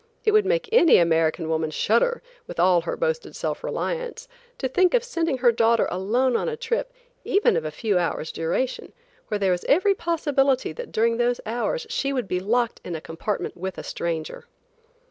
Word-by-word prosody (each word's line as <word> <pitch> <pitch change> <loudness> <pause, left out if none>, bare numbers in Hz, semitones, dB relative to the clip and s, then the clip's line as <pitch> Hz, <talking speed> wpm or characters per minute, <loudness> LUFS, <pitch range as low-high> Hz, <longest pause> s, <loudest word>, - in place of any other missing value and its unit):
It 430 - +4
would 425 -2 +4
make 485 +3 +1
any 395 -9 +6
American 165 -1 +2
woman 160 0 0
shudder 235 - +1 0.2
with - - -8
all 175 0 +4
her 165 - -4
boasted 485 -1 -2
self - - -3
reliance, - - -4 0.3
to 265 - -1
think 365 - +3
of 485 - +2
sending 335 - -1
her 245 -1 +4
daughter 230 0 +3
alone 235 +8 +1
on - - 0
a 460 - -4
trip, 480 +1 -2 0.3
even 400 +2 +2
of 160 -2 -1
a - - -1
few 195 +4 0
hours' 165 -2 -2
duration, 170 +11 -2 0.3
where 210 - -1
there 195 -2 +1
was 180 -1 -1
every 375 +7 +4
possibility 290 -7 0
that - - -8
during 230 +1 +1
those 240 0 +1
hours 245 - -2
she 275 - -1
would 250 -6 -2
be 180 0 -1
locked 235 +5 0
in 175 - -5
a - - -4
compartment 165 +6 -4
with 190 +1 -5
a - - -6
stranger. 165 -2 -4
245 Hz, 190 wpm, -24 LUFS, -, 0.3 s, any